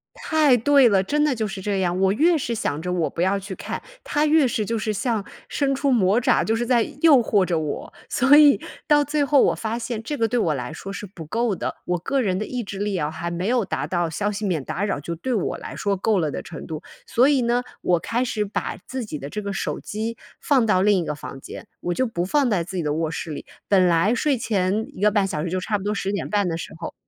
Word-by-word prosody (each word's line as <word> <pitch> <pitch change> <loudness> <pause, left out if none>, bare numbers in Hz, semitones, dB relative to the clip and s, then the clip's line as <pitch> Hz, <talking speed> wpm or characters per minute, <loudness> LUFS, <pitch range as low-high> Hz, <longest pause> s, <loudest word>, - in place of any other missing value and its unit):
太 300 -6 +3
对 270 +1 +5
了， 195 -2 +3
真 295 +8 +1
的 290 -4 +2
就 220 -1 -1
是 195 -1 -6
这 200 0 -1
样， 180 -1 0
我 190 0 +3
越 325 +7 +3
是 240 -4 -2
想 155 -7 -2
着 180 +1 -3
我 170 -3 0
不 170 - -4
要 190 +2 +2
去 195 0 -7
看， - - -5 0.2
它 295 +1 +1
越 305 -2 +4
是 215 -3 -1
就 230 +1 -1
是 215 0 -1
像 210 0 -1 0.2
伸 275 -1 0
出 275 0 +1
魔 205 -2 +3
爪， 245 - +3
就 225 - +1
是 240 +1 -1
在 240 -1 +3 0.2
诱 315 -5 +7
惑 205 -5 +2
着 170 -3 0
我， 150 -2 -5 0.2
所 270 +3 +5
以 295 -1 +7 0.3
到 295 -1 +5
最 290 0 0
后 280 0 +4
我 - - +2
发 225 +1 -3
现 230 -1 -4
这 290 +6 -4
个 225 - +2
对 245 +2 0
我 160 -8 +1
来 125 +3 -5
说 195 +5 -7
是 205 - -6
不 180 -4 -10
够 225 +5 0
的， - - -4
我 180 - 0
个 270 +9 0
人 185 -4 0
的 215 - -2
意 250 -2 -4
志 200 -1 -7
力 205 -2 -1
啊 150 -2 -1
还 165 +2 -4
没 175 +3 -3
有 245 -1 +2
达 - - -3
到 175 -2 -1
消 205 +6 -1
息 210 +1 -4
免 165 -8 -1
打 195 - -3
扰， 200 -8 -1
就 170 +3 -5
对 255 +10 -3
我 205 -7 -1
来 - - -8
说 200 -1 0
够 210 +2 +1
了 155 -4 0
的 - - -4
程 160 - -9
度， 155 -1 -6 0.2
所 255 +5 +3
以 275 -3 +3
呢， 240 +1 +1 0.2
我 175 -2 +2
开 240 +7 -1
始 215 -3 -1
把 200 - -3
自 260 -3 -4
己 155 -8 -6
的 140 +1 -7
这 210 - -4
个 200 - -3
手 195 - -3
机 220 +2 -4 0.2
放 265 -5 +3
到 185 -4 +3
另 205 0 +4
一 170 - -2
个 150 - -2
房 135 -1 -8
间。 - - -10
我 175 - -1
就 260 - +1
不 180 -7 -2
放 270 +5 +2
在 180 -5 +1
自 185 +2 -8
己 170 - -1
的 150 -1 0
卧 160 0 -1
室 165 -1 -5
里， 145 - -6 0.2
本 190 -2 +4
来 170 +7 +3
睡 275 +1 +1
前 205 -1 0
1 - - -11
个 210 - +4
半 200 -2 +2
小 155 -4 -3
时 175 - -2
就 185 +1 -1
差 210 +3 -1
不 190 - -8
多 210 +1 -1
10 195 0 -2
点 200 - -3
半 205 -2 +1
的 165 - -2
时 - - -7
候 165 - -6
205 Hz, 290 characters per minute, -23 LUFS, 180-245 Hz, 0.3 s, 诱